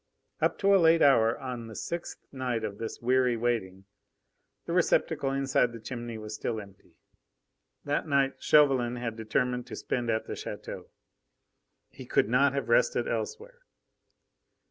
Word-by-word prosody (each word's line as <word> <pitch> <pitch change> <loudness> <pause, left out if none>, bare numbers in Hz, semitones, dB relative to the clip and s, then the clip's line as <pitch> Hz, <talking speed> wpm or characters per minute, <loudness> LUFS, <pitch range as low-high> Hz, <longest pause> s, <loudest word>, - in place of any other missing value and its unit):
Up - - +1
to 200 0 +3
a 195 - +5
late 165 0 +5
hour 115 -5 +4
on 125 -3 -6
the 110 - -10
sixth 170 +9 -6
night 125 -4 -2
of 105 -2 -5
this 115 - -5
weary 125 -1 +2
waiting, 100 -5 -2 0.8
the - - -3
receptacle 135 - +2
inside 135 -3 +1
the 115 - -8
chimney 120 0 -6
was 110 0 -7
still 110 +1 -3
empty. 100 -2 -15 0.9
That 145 +2 -1
night 140 -2 +2
Chauvelin 135 -5 +4
had 120 -2 -4
determined 125 +3 -1
to - - -7
spend 120 -2 -3
at 110 0 0
the - - -5
chateau. - - -7 1.0
He - - -11
could - - +2
not 135 +3 +3
have 140 - -2
rested - - +2
elsewhere. 475 +3 -4
125 Hz, 150 wpm, -28 LUFS, 115-140 Hz, 1.0 s, a